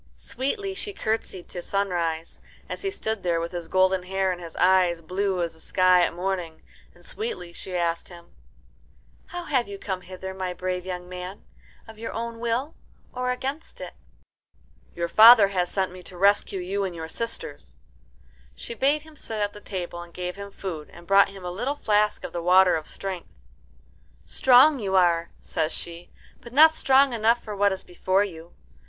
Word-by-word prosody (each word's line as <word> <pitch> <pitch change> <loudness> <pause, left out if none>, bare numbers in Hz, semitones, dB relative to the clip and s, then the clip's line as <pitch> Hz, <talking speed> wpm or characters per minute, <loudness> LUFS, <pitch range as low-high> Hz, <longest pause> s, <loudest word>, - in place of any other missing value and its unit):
Sweetly 390 - -3
she 405 +1 -4
curtsied 220 - -3
to 175 - -6
Sunrise, 175 -5 -2 0.3
as - - -5
he 390 - -1
stood 220 - -3
there 170 -2 0
with 170 +1 -4
his 175 -2 -5
golden 185 +1 +3
hair 190 +1 0
and 180 -1 -5
his 165 -1 -9
eyes 180 -2 +4
blue 185 +2 -1
as 170 - -3
the 160 - -17
sky 185 +1 +4
at - - +1
morning, 175 -2 -4 0.3
and - - -20
sweetly 430 - -5
she 185 +1 -7
asked 170 -1 -1
him, 170 -1 -14 0.9
"How 355 0 -6
have 260 -9 0
you 200 0 -7
come 190 -2 -4
hither, 190 +1 -7
my 185 -1 -4
brave 185 0 -3
young 180 -1 -5
man 180 +2 -8 0.4
of 220 -1 -12
your 230 - -5
own 230 0 -4
will 235 +6 -1 0.4
or 250 0 -2
against 270 +5 -4
it?" - - -7 1.0
"Your 170 0 -1
father 220 +2 +9
has 180 -3 0
sent 185 -2 -2
to 180 - -11
rescue 200 0 +3
you 195 +3 -2
and 185 -3 -3
your 160 -1 -6
sisters." 230 +7 -5 0.8
She - - -7
bade 285 +5 +1
him 315 -1 -16
sit 225 -6 -4
at 205 0 -1
the 210 - -11
table, 175 -4 -5
and 175 0 -11
gave 180 0 -5
him 200 0 -8
food 175 -6 -6
and 170 - -14
brought 195 +2 +5
him 195 -2 -11
a 180 - -3
little 250 +10 -2
flask 210 -6 +1
of - - -6
the 170 - -3
water 180 +1 +5
of 155 -1 -4
strength. 190 -3 -6 1.0
"Strong 265 - +5
you 195 -3 -1
are," 170 -2 +3
says 155 -1 -2
she, 170 0 -6 0.3
"but 235 - -13
not 315 +3 +8
strong 270 -3 +4
enough 230 +1 +2
for 210 -2 -6
what 200 0 +3
is 190 - -4
before 185 +2 +1
you. 170 -4 -8
190 Hz, 185 wpm, -25 LUFS, 175-225 Hz, 1.0 s, father